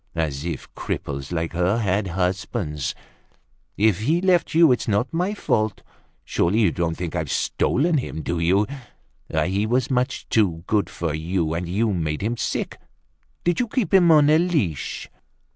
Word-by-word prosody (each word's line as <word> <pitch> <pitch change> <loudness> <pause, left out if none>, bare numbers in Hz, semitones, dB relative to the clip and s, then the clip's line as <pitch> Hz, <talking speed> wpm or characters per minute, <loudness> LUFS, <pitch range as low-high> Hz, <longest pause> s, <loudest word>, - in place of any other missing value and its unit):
As 75 -4 -2
if 85 - -4
cripples 70 0 -4
like 80 -1 -2
her 90 +5 +1
had 100 -2 0
husbands! 90 - -2 0.8
If 105 -2 +3
he's 160 - +1
left 180 -4 +2
you 165 -3 +7
it's 125 - 0
not 110 +6 0
my 180 +5 0
fault. 110 - -1 0.4
Surely 95 +6 +1
you 100 -7 +4
don't 85 -1 -1
think 90 -1 -4
I've 80 -4 -2
stolen 155 +3 +1
him, 80 -11 -5
do 85 - -2
you? 95 +5 +3 0.7
He 95 +7 0
was 125 +3 +1
much 125 +1 -1
too 90 -7 +1
good 105 +1 +1
for 85 -3 -3
you 80 +1 -1
and 85 +1 -3
you 105 +3 +1
made 80 -2 -2
him 115 +3 0
sick. - - -3 0.6
Did 175 -1 +1
you 245 - +1
keep 225 -2 -1
him 180 -3 +6
on 150 -2 +6
a 155 - +5
leash? 145 - -1
100 Hz, 165 wpm, -23 LUFS, 85-130 Hz, 0.8 s, you